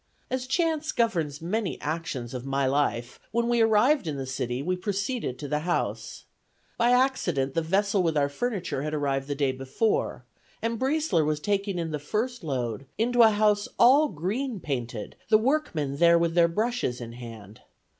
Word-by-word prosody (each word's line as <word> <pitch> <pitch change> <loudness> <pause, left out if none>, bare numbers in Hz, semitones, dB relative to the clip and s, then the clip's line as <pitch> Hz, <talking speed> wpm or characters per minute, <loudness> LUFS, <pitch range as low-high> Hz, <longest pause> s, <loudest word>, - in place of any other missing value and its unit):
As 255 0 -2
chance 315 +1 0
governs 165 - 0
many 200 +2 -2
actions 150 -6 -4
of 125 -1 -5
my 135 0 0
life, 130 -3 0
when 235 +1 0
we 240 -1 +2
arrived 225 - +4
in 150 -3 -2
the 135 - -4
city, 125 -1 -3
we 180 +4 0
proceeded 200 - -2
to 145 - -6
the 150 +1 0
house. 175 +3 -2 0.5
By 235 - +2
accident, 245 - +2
the 165 - +1
vessel 195 +4 +1
with 165 -3 +1
our 140 -1 +3
furniture 175 - -3
had 155 +1 -2
arrived 135 -2 -1
the 145 - -2
day 140 -2 +1
before, 135 - -1 0.3
and 230 0 -2
Briesler 270 - +1
was 150 0 0
taking 200 +1 -1
in 165 -2 -2
the 150 - -2
first 225 - -3
load 130 -4 -3
into 240 +2 +3
a 225 - +8
house 210 -1 +2
all 275 +6 +6
green 210 - -3
painted, 120 - -4
the 215 - +7
workmen 215 - 0
there 170 +1 +6
with 170 -1 +1
their 170 -1 +5
brushes 215 - -1
in 115 -1 -7
hand. 115 -4 -10
170 Hz, 175 wpm, -27 LUFS, 140-230 Hz, 0.5 s, a